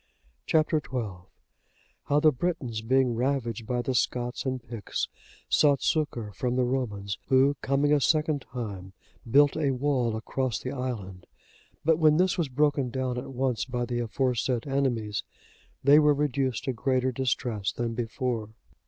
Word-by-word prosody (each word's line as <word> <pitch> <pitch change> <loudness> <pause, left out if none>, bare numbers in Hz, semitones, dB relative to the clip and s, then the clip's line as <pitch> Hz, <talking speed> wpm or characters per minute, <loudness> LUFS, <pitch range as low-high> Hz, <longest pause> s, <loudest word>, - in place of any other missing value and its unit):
Chap. 155 -1 +3
XII. 115 - -3 0.8
How 145 - +3
the 155 +1 +5
Britons, 130 -6 -2
being 130 +1 +2
ravaged 120 -3 -1
by 125 -1 -1
the 130 - -1
Scots 125 +1 -1
and 130 0 -1
Picts, 115 -3 -3 0.4
sought 140 -3 +3
succour 130 -9 0
from 125 +5 -2
the 130 - +2
Romans, 105 -6 -2
who 135 +2 +4
coming 140 +2 +2
a 145 - +3
second 155 0 +2
time, 100 -8 -7 0.4
built 145 +3 +5
a 150 -3 +1
wall 130 -3 0
across 125 +2 -2
the 130 - -5
island; 115 -9 -5 0.6
but 160 0 +4
when 155 -1 +5
this 185 +1 +3
was 165 -5 -1
broken 140 -1 +1
down 130 -1 -2
at 125 - -8
once 130 -2 0
by 125 -1 -2
the 120 0 -2
aforesaid 120 0 0
enemies, 125 -7 -1 0.6
they 140 +3 +7
were 150 -1 +4
reduced 135 -4 0
to 130 - -1
greater 130 +2 0
distress 120 -5 -1
than 120 -1 -3
before. 115 -1 -2
130 Hz, 155 wpm, -27 LUFS, 115-140 Hz, 0.8 s, they